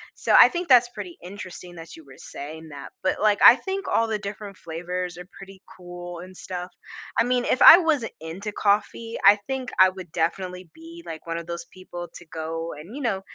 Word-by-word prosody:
So, - - +1
I - - +9
think 350 0 -4
that's 245 -2 +6
pretty 200 -7 -9
interesting 180 -2 -10
that 165 -1 -11
you 160 - -14
were 135 -1 -16
saying 160 +2 -9
that, 140 -1 -9
but, 185 - -1
like, 210 -1 +3
I 245 - +11
think 390 0 -5
all 230 - +1
the 215 -1 -1
different 200 -1 -8
flavors 175 +2 -5
are 180 - -10
pretty 195 -1 -13 0.2
cool 175 -1 -9
and 185 +1 -11
stuff. 180 0 -7 0.5
I - - +5
mean, 245 0 0
if - - 0
I 330 - +11
wasn't 310 -10 0
into 180 +7 -6
coffee, 215 +3 -1
I 200 +1 +9
think 265 -2 -4
I 185 - +8
would 185 -3 -11
definitely 180 +2 -3
be 335 +1 -13
like 160 - -8
one 165 0 -3
of 170 - -6
those 170 0 -6
people 175 -2 -9
to 175 - -11
go 165 +1 -5
and, 175 - -11
you 290 - -6
know, 195 -5 -1
185 Hz, 210 wpm, -24 LUFS, 170-225 Hz, 0.5 s, I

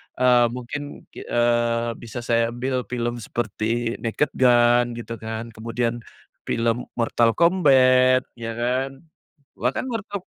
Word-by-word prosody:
Eee, 125 -1 +4
mungkin 145 +4 -7
ki - - -10
eee, 120 0 +1
bisa 120 +1 -7
saya 115 0 +1
ambil 125 +1 -2
film 120 -1 -3
seperti 115 0 -2
Naked 120 +6 -1
Gun 120 -1 +4
gitu 115 0 -7
kan, 110 +1 -6
kemudian 115 +2 -3 0.5
film 115 +1 0
Mortal 115 -1 +2
Kombat 130 -7 +5 0.2
ya 115 -1 -5
kan. 125 +3 -1 0.7
Bahkan 125 - -1
Mortal 205 -3 -4
120 Hz, 120 wpm, -23 LUFS, 115-130 Hz, 0.7 s, Kombat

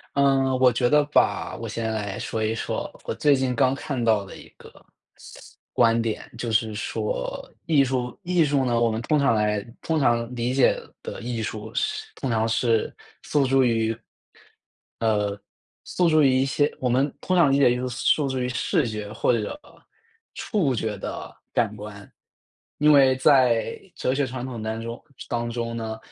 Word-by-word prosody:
嗯， 135 -1 +3
我 130 -1 +6
觉 120 +1 +1
得 150 0 +5
吧， 150 - +1
我 - - -6
先 115 -1 -3
来 105 -3 -4
说 110 -1 -3
一 110 +1 0
说， 115 - -3 0.2
我 - - -3
最 145 -2 +4
近 130 -2 -1
刚 130 +2 +3
看 135 -2 -4
到 110 -3 +3
的 95 - -11
一 - - -13
个 - - -14 1.0
观 115 -1 +3
点， 115 -2 -4
就 120 -2 -3
是 110 -1 +1
说 105 - -4 0.2
艺 150 -4 +4
术 125 -2 -2
艺 175 -2 +2
术 140 -2 +1
呢， 120 -2 +1
我 120 - +3
们 110 +1 -2
通 150 +2 +1
常 135 -5 +3
来 105 -1 +1 0.2
通 160 -1 0
常 120 -2 +1
理 120 +2 -1
解 135 -2 +5 0.3
的 - - -7
艺 115 -1 -3
术 110 0 -6
是 - - -1
通 130 - -4
常 110 -1 +1
是 115 -1 +1 0.3
诉 145 -2 +1
诸 135 0 +3
于 115 -2 +1 1.1
呃， 105 -2 0 0.4
诉 175 -2 +1
诸 155 -1 +4
于 135 - +5
一 135 - +2
些 145 +2 +1
我 125 - 0
们 135 +4 +1
通 185 - 0
常 170 -6 +5
理 135 - +3
解 135 -3 +5
艺 - - +1
术 125 - -3
诉 135 +4 +1
诸 130 - -2
于 125 - -1
视 130 +3 0
觉 105 -2 -5
或 115 - +1
者 115 - -3 0.7
触 165 - 0
觉 110 -2 -3
的 - - -7 0.2
感 110 -2 0
官。 105 -1 -10 0.7
因 150 +1 +5
为 135 -2 +6
在 130 -5 +3 0.2
哲 130 - -1
学 140 0 0
传 125 0 -5
统 120 -4 -6
当 110 +1 -3
中 115 +1 -6 0.3
当 120 0 -2
中 115 0 -3
呢， 110 -1 -4
120 Hz, 200 characters per minute, -24 LUFS, 110-135 Hz, 1.1 s, 我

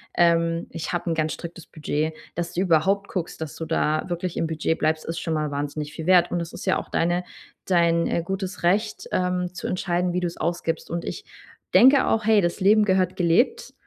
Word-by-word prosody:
ähm, 170 -1 +2
ich 165 +1 -5
habe 175 0 -2
'n - - +2
ganz 155 -1 0
striktes 170 0 -9
Budget.“ 155 0 -2 0.2
Dass 170 0 -3
du 180 - 0
überhaupt 195 +3 +2
guckst, 175 -3 -4
dass 160 -2 -6
du 160 - -4
da 155 0 0
wirklich 175 0 -3
im 165 - 0
Budget 160 0 -1
bleibst, 155 0 +1
ist 165 0 -4
schon 165 - -2
mal 150 -1 -1
wahnsinnig 145 +1 -4
viel 155 +1 -7
wert 180 -1 +5
und 175 - 0
es 170 0 -7
ist 215 - -8
ja 185 - +2
auch - - -8
deine 175 +2 0 0.4
dein, 170 -2 +3
äh, 170 - -1
gutes 190 +2 -4
Recht, 210 +5 0
ähm, 180 -1 -1
zu 180 - -5
entscheiden, 180 -1 -1
wie 180 - 0
du's 175 -1 -3
ausgibst 165 -1 -2
und 170 +1 -3
ich 420 - -6 0.5
denke 265 +1 +6
auch: 220 -1 +1
„Hey, 220 -1 +5
das 175 +1 -1
Leben 210 +2 +5
gehört 185 -2 +1
gelebt.“ 240 - +1
175 Hz, 210 wpm, -24 LUFS, 165-185 Hz, 0.5 s, denke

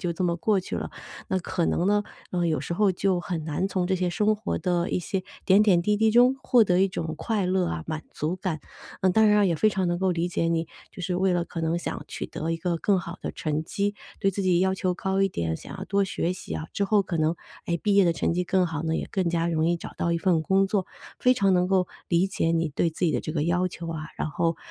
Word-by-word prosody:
就 175 -3 -1
这 175 +2 -2
么 170 -1 +1
过 205 +4 +2
去 185 - -5
了。 - - -3 0.4
那 190 - +1
可 180 -1 -2
能 175 - +1
呢， 205 +1 +3 0.3
呃， 175 -1 0
有 155 - 0
时 170 - -3
候 200 +2 +3
就 185 0 0
很 170 -2 -4
难 160 +5 -1
从 185 -2 -1
这 190 - +1
些 180 -1 0
生 210 +4 +2
活 210 0 -3
的 175 -1 0
一 - - +1
些 185 +2 -3 0.2
点 195 +2 +6
点 190 -5 +4
滴 210 +4 +1
滴 220 +1 +3
中 245 +3 +5
获 240 -3 +5
得 180 -2 +2
一 195 - +3
种 160 -3 -4
快 210 +1 -1
乐 185 0 +1
啊、 80 -1 -4
满 155 0 -4
足 155 +4 -2
感。 185 -3 -3 0.4
呃， 190 - +3
当 220 +3 +5
然 210 - +5
啊 205 - +4
也 175 -3 +2
非 165 +8 +3
常 190 -2 0
能 175 0 0
够 190 -1 +2
理 170 -1 0
解 165 -1 0
你， 165 0 0 0.2
就 - - -10
是 180 0 -2
为 185 +1 +2
了 175 -1 +1
可 170 - -6
能 165 +1 0
想 - - -5
取 - - -5
得 160 - -4
一 165 - 0
个 170 +1 -1
更 195 +3 +2
好 175 0 -6
的 - - -3
成 155 0 -2
绩， 200 +5 -2 0.2
对 195 -1 +1
自 195 - -2
己 180 -2 +3
要 190 +1 +2
求 185 -1 0
高 190 +1 0
一 195 - +3
点， 80 - -2
想 - - -10
要 190 - -5
多 200 0 +1
学 180 -2 -1
习 185 - -8
啊， 160 - -4
之 200 - 0
后 205 +1 +3
可 180 -2 -3
能， 160 +1 +1 0.3
哎， 170 0 0
毕 205 -2 +1
业 200 -1 +6
的 170 - +3
成 165 - 0
绩 180 +2 0
更 185 0 +2
好 160 -3 -4
呢， 160 0 0
也 - - -3
更 190 -3 +1
加 165 0 0
容 160 -2 +1
易 175 - +2
找 - - -8
到 170 - 0
一 170 - +1
份 170 -2 +2
工 195 +4 +3
作。 195 -2 0 0.3
非 250 - +5
常 195 -6 +3
能 180 0 +2
够 185 -1 +2 0.2
理 175 +2 +3
解 185 -4 0
你 165 -1 +1
对 160 +3 0
自 160 - -2
己 165 - +2
的 - - 0
这 - - -5
个 150 -2 0
要 180 +2 +1
求 170 -1 -8
啊， 155 -2 -5
然 - - -2
后， 165 +2 0
180 Hz, 300 characters per minute, -26 LUFS, 165-195 Hz, 0.4 s, 点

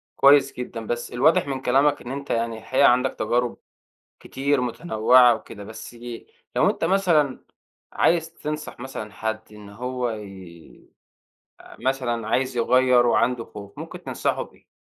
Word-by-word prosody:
كويس 140 0 +5
جدًا، 120 -2 -6
بس 120 +2 -4
الواضح 140 +4 +3
من 135 -2 -3
كلامك 140 +3 +2
إن 125 - -7
أنت 140 +1 -6
يعني 115 -1 -1
الحقيقة 130 +5 +3
عندك 125 +1 +2
تجارب 120 0 0 0.6
كتير 140 0 -1
متنوعة 125 -2 +4
وكده، 105 -1 -10
بس 110 +3 -10 0.6
لو - - +4
أنت - - -3
مثلًا 165 -6 +2 0.5
عايز 165 -1 +1
تنصح 150 -3 -6
مثلًا 120 -5 -7
حد 110 0 -3
إن 105 -1 -12
هو 125 +3 -3
يي 95 -6 -11 0.7
آآ - - -14
مثلًا 120 -4 -1
عايز 130 +2 0
يغيّر 125 +1 +4
وعنده 120 0 +2
خوف، 100 -2 -12
ممكن - - -8
تنصحه - - -1
بإيه؟ - - -15
125 Hz, 140 wpm, -23 LUFS, 115-135 Hz, 0.7 s, كويس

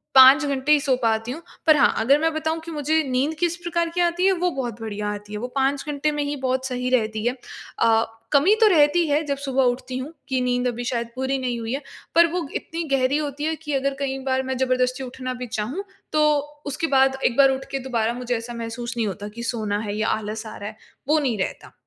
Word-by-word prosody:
5 265 +4 +9
घंटे 280 +1 0
ही 300 - +7
सो 270 -3 +2
पाती 225 +1 +1
हूँ। 320 +5 -6 0.3
पर 310 - +8
हाँ, - - +4
अगर 270 +6 +4
मैं 325 +1 +1
बताऊँ 315 +1 -1
कि 330 +1 -8
मुझे 310 +1 +1
नींद 265 +5 +1
किस 345 -1 +1
प्रकार 340 -1 -1
की 355 - +2
आती 345 +1 +2
है 390 - +5
वो 360 -1 +1
बहुत 240 -5 -4
बढिया 210 -1 -3
आती 205 0 -9
है। 210 - -3
वो 245 - -3
5 270 +1 +1
घंटे 295 +1 0
में 295 -1 -1
ही 290 +1 -2
बहुत 260 -1 -1
सही 250 0 -2
रहती 220 -3 0
है। 245 - +2 0.5
अ, 225 0 +4 0.3
कमी 320 +10 +5
तो 440 - +8
रहती 330 -1 +4
है 295 +2 +2
जब 280 -1 -1
सुबह 270 -1 0
उठती 250 +1 -1
हूँ 270 +5 -6 0.2
कि 260 -1 +1
नींद 250 0 +1
अभी 245 0 -3
शायद 235 -1 -1
पूरी 265 +1 -1
नहीं 245 -2 -2
हुई 230 +2 -3
है। 280 - -2 0.3
पर 340 0 +7
वो 350 -5 -2
इतनी 330 +1 -3
गहरी 260 +3 +2
होती 290 -1 -3
है 320 +1 0
कि 300 -2 -3
अगर 275 0 +1
कई 270 -1 -2
बार 265 0 +1
मैं 260 0 -3
ज़बरदस्ती 255 0 +1
उठना 255 0 -5
भी 250 - -4
चाहूँ 235 - -3 0.3
तो 305 0 +4 0.4
उसके 290 +3 -2
बाद 270 -1 +3
एक 235 - +1
बार 270 -1 +7
उठ 265 0 -3
के 275 - -1
दोबारा 230 -1 +1
मुझे 245 0 -2
ऐसा 230 +1 -7
महसूस 235 +1 -5
नहीं 225 -2 +1
होता 205 +1 -5
कि 235 - -5
सोना 215 -3 -1
है 205 - -3
या 220 +1 0
आलस 215 +1 -2
आ 220 - -8
रहा 205 - -5
है। 215 - -14 0.3
वो 310 +2 +4
नहीं 255 -7 0
रहता। 190 - -4
265 Hz, 245 wpm, -23 LUFS, 235-295 Hz, 0.5 s, 5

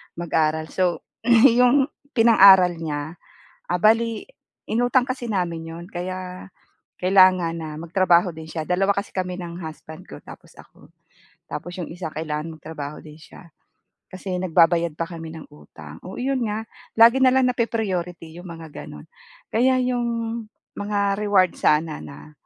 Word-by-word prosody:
mag-aral. 160 -2 -1
So, 180 -2 0 0.2
yung 250 +4 +5 0.2
pinang-aral 195 -6 +6
nya, 155 +1 -5 0.5
ah, 180 - 0
bale 225 - +1 0.3
inutang 245 +3 +1
kasi 255 -2 -5
namin 170 -5 -3
'yon 170 +1 -9
kaya 185 +1 -6 0.5
kailangan 185 -2 +4
na 155 -2 -6
magtrabaho 175 0 +2
din 160 0 -10
sya, 160 -1 -5
2 195 +2 +1
kasi 200 +1 -2
kami 185 -1 -3
ng 175 0 -7
husband 155 0 -9
ko - - -11
tapos - - -15
ako. - - -18 0.6
Tapos 175 +1 -7
yung 175 -3 -6
isa 170 -1 -6
kailangan 155 +1 -5
magtrabaho 150 -2 -7
din 155 0 -13
sya 170 0 -16 0.6
kasi 185 -1 -5
nagbabayad 170 -2 +2
pa 165 - -2
kami 165 -1 -8
ng 160 - -12
utang. 75 +1 -13
Oo, 185 - -8
'yon 265 +1 -1
nga, 215 +1 -3 0.3
lagi 230 +3 +6
na 260 - +5
lang 260 0 +3
napa-priority 180 -8 -3
yung 180 - -10
mga 165 -2 -10
gano'n. 75 - -10 0.5
Kaya 255 +3 +3
yung 245 -1 -1 0.7
mga 200 -1 -1
reward 200 -4 +3
sana 155 0 +1
na 145 +2 -12
180 Hz, 145 wpm, -22 LUFS, 160-210 Hz, 0.7 s, pinang-aral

